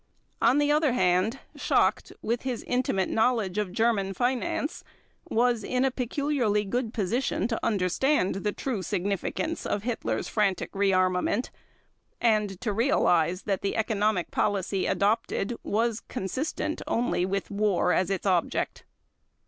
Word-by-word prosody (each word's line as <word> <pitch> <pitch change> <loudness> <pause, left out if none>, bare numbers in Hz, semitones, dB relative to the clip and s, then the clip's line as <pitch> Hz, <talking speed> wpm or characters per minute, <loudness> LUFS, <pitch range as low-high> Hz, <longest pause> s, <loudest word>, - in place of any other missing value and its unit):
On 235 +4 +4
the 290 0 +3
other 300 -3 +3
hand, 185 +2 +2 0.2
Schacht, - - +1
with 235 +2 -1
his 255 -3 -3
intimate 240 -7 0
knowledge 220 -4 +1
of 205 -3 -2
German 200 -2 +1
finance, 250 - -1 0.5
was 235 -1 +2
in 255 +4 +1
a 265 - +2
peculiarly 250 -4 0
good 235 +3 -2
position 225 0 0
to 225 - -3
understand 200 - +1
the 210 +1 -1
true 235 -2 -3
significance 200 - -2
of 205 - -2
Hitler's 240 -1 -2
frantic 200 -4 0
rearmament, 190 +2 +1 0.7
and 210 -5 +1
to 215 -4 -1
realize 180 - +2
that 195 -2 -1
the 200 - -1
economic 215 -4 0
policy 195 -2 0
adopted 215 +1 0
was 225 +1 0
consistent 265 - -3
only 235 -6 0
with 195 +2 -2
war 200 -3 +2
as 185 - +1
its 195 0 -2
object. 180 -4 0
215 Hz, 130 wpm, -27 LUFS, 195-245 Hz, 0.7 s, On